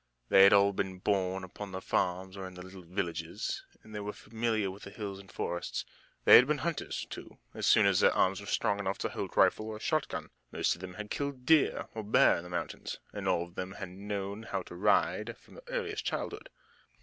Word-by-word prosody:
They 95 - +8
had 100 - +7
all 100 0 +5
been 95 -1 -2
born 95 -1 0
upon 95 +2 -8
the 95 - -3
farms 95 +1 -1
or 95 -1 -6
in 95 - -11
the 90 - -8
little 95 0 -11
villages, 85 -1 -3 0.2
and 110 - -14
they 105 - -4
were 105 0 -4
familiar 110 -2 -1
with 100 +2 -11
the - - -8
hills 100 -1 -6
and 100 -1 -14
forests. 85 0 -3 0.4
They - - +11
had 125 - +6
been 150 0 +1
hunters, 170 -2 -2
too, - - -9 0.2
as - - -2
soon - - +6
as - - +4
their - - +6
arms 95 +1 +2
were 100 - -10
strong 100 +1 +1
enough 95 -1 -1
to - - -2
hold - - -5
rifle 110 - +4
or 110 -1 -5
shot 155 +4 0
gun. - - -6 0.2
Most - - +1
of 85 - -10
them 90 -1 -7
had 105 0 -7
killed 140 -3 -3
deer 155 0 +4
or 110 - -4
bear 105 - +5
in 85 - -6
the 90 - -10
mountains, 90 -1 -4 0.2
and - - -4
all 85 - +2
of 85 0 -12
them 95 +1 -5
had 100 -2 -6
known 100 +2 -5
how 110 - -3
to - - -11
ride - - +2
from - - -15
earliest 470 -4 -3
childhood. - - -4
100 Hz, 225 wpm, -31 LUFS, 95-110 Hz, 0.4 s, They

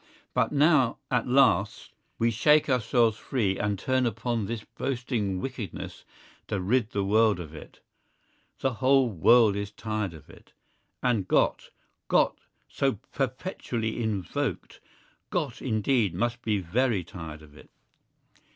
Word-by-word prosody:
But - - +1
now 145 -4 +3
at 125 -2 +1
last 125 -5 +2 0.3
we 115 +1 +2
shake 150 +7 +4
ourselves 115 -3 +2
free 105 -8 -1
and 105 -1 0
turn 130 +4 +1
upon 115 -1 -2
this 115 -2 -4
boasting 120 -8 -3
wickedness 120 -6 -6 0.4
to 105 - -2
rid 110 +4 +1
the 100 -3 -1
world 105 0 +3
of 80 -3 -8
it. 75 - -12 0.8
The 135 -1 +1
whole 130 0 +3
world 105 +4 +5
is 100 0 -3
tired 105 -3 -4
of 75 - -14
it. - - -18 0.5
And 115 -7 +1
"Gott!"—Gott - - 0 0.3
so 135 -1 0 0.2
perpetually 125 -4 -3
invoked—Gott 110 - -4
indeed 110 -3 +1
must 120 +4 -1
be 110 -3 0
very 100 +2 0
tired 80 -3 -9
of 75 -1 -17
it. - - -16
115 Hz, 125 wpm, -27 LUFS, 100-125 Hz, 0.8 s, world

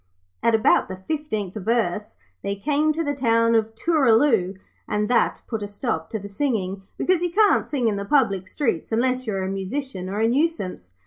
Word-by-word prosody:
At 230 - +3
about 220 - +3
the 185 - -6
fifteenth 215 - -3
verse 210 -1 -1 0.2
they 200 0 -2
came 295 +8 +1
to 325 +2 -1
the 290 -2 -1
town 230 -3 +2
of 225 0 +1
Tooraloo, 230 - +3 0.3
and 210 0 0
that 245 - +2
put 225 -3 -4
a 205 - -3
stop 205 -6 -3
to 220 - -3
the 200 -1 -8
singing, 200 -4 -2 0.2
because 365 -2 +1
you 355 - 0
can't 415 +4 +3
sing 260 -5 0
in 210 -2 0
the 200 - -3
public 200 -8 +2
streets 230 - -2
unless 255 +2 0
you 215 - -1
are 190 - -1
a - - -2
musician 195 +1 -4
or 200 +2 -3
a 225 - +3
nuisance. 235 - -1
225 Hz, 195 wpm, -23 LUFS, 195-280 Hz, 0.3 s, At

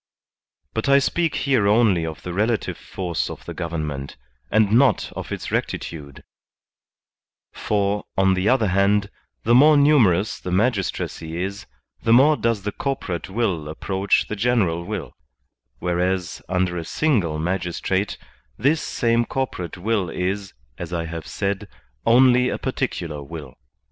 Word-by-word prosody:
But 110 +5 -1
I 140 - +7
speak 165 +4 +1
here 130 -8 +2
only 100 -6 +3
of 80 - -7
the 90 - -5
relative 110 +4 0
force 90 -3 -3
of - - -9
the - - -6
gov 85 -2 -4
ernment, 75 -4 -4 0.3
and 110 -1 +3
not 130 +4 +3
of - - -6
its - - -5
rectitude; 70 -4 -4 1.3
for, 100 -1 -1
on 95 0 +4
the 95 +3 +1
other 120 -6 +3
hand, 100 +2 +2 0.3
the 115 - +3
more 150 +4 +7
numerous 110 - +4
the - - -6
magistracy 90 -5 -1
is, 100 +2 -5 0.3
the 115 - +3
more 140 +5 +6
does 115 -7 -1
the 105 - -2
corporate 100 - -3
will 95 -8 -1
approach 95 +5 0
the 105 - -4
general 100 -7 +1
will; - - -5 0.6
whereas, 90 0 -1
under 90 -1 0
a - - -5
single 95 - 0
magistrate, 90 +3 -1 0.4
this 145 +7 +2
same 115 -1 +1
corporate 115 -10 -4
will 100 -1 0
is, 95 +2 -3 0.2
as 85 -1 -6
I 85 -1 -2
have 80 -2 -6
said, 100 +1 -2 0.4
only 125 +1 +5
a - - -2
particular 75 -4 -3
will. 70 -2 -8
100 Hz, 145 wpm, -22 LUFS, 85-115 Hz, 1.3 s, I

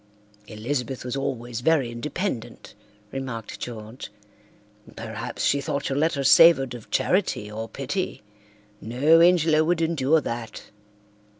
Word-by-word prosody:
"Elizabeth 125 +4 -4
was 125 - -3
always 120 -3 -4
very 140 -4 +2
independent," 130 - -5 0.4
remarked 130 -5 -6
George. 115 +1 -7 0.9
"Perhaps - - -5
she 140 - +2
thought 140 +1 -3
your 135 - -1
letter 150 -3 +1
savoured 135 -2 +6
of 120 -3 -10
charity 175 - 0
or 110 +1 -6
pity. 140 - -4 0.6
No 140 +9 +4
Ingelow 165 -3 +4
would 170 +1 +1
endure 160 -2 +2
that." 115 -5 -6
135 Hz, 115 wpm, -24 LUFS, 120-160 Hz, 0.9 s, savoured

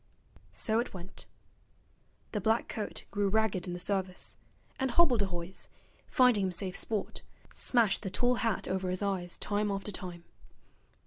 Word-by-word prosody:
So 220 0 +1
it 235 - -2
went. 185 +1 -8 1.0
The 210 - -1
black 220 +4 +2
coat 215 -2 -4
grew 205 0 +1
ragged 210 -4 +1
in 175 - -3
the 175 - -4
service, 190 -1 -1 0.4
and 265 - +1
hobbledehoys, 200 - +2 0.4
finding 250 -7 +5
him 185 - 0
safe 185 +1 -1
sport, 215 -3 -1 0.3
smashed 230 -6 +3
the 190 - -3
tall 245 +6 +2
hat 230 -5 0
over 185 0 -1
his 185 +2 -1
eyes 185 -3 -1
time 205 0 0
after 195 +1 -2
time. 180 -3 -6
200 Hz, 145 wpm, -31 LUFS, 185-220 Hz, 1.0 s, finding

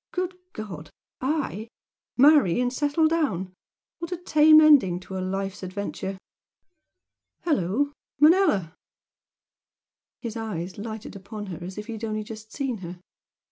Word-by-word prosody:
Good 365 0 -2 0.2
God! 180 -8 -7 0.3
I? 260 -6 -2 0.5
Marry 270 - +6
and 250 0 0
settle 295 +3 +2
down? 215 - -1 0.5
What 335 +1 -6
a 360 - -2
tame 310 -2 +6
ending 280 - +6
to 190 - -8
a 185 - -2
life's 195 +1 -3
adventure! 190 0 -5 1.3
Hello, 285 - 0 0.3
Manella!" 300 - +4 1.5
His 235 -2 -6
eyes 195 -5 -5
lighted 220 -1 -7
upon 205 +2 -7
her 170 - -8
as 185 +2 -7
if 210 - -5
he 230 - -6
had 220 0 -8
only 215 -1 -2
just 220 0 -10
seen 270 -5 -2
her. 175 0 -8
220 Hz, 135 wpm, -25 LUFS, 190-290 Hz, 1.5 s, Marry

